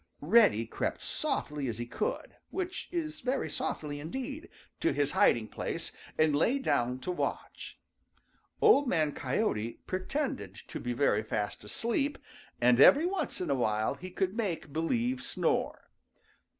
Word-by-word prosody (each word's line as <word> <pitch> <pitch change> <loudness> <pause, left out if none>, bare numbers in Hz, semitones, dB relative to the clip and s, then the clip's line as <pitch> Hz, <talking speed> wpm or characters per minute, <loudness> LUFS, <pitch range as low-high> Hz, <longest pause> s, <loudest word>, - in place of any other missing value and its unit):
Reddy 185 - +5
crept - - -3
softly 150 - -1
as 115 -3 -3
he 120 - -3
could, 465 - -3
which 370 0 -4
is 315 -3 -3
very 265 +1 -1
softly 145 -1 -3
indeed, 265 - -5 0.3
to 335 - +2
his 145 0 +1
hiding 110 -2 +3
place - - -3 0.3
and 155 -2 +4
lay 230 - +3
down 125 - +1
to 180 - -2
watch. 180 - -4 0.9
Old 355 -11 +6
Man 155 -9 +2
Coyote 125 - -1
pretended 185 - -3
to - - -8
be 125 - -2
very 120 -5 +2
fast 105 -1 -3
asleep, 235 - -1 0.4
and 125 0 +4
every 285 - +8
once 375 +1 -2
in 180 - -1
a - - +3
while 110 -3 +1
he 180 +6 -9
would 190 -1 +1
make 180 -10 -3
believe 240 +11 0
snore. 275 - -1
170 Hz, 145 wpm, -31 LUFS, -, 0.9 s, every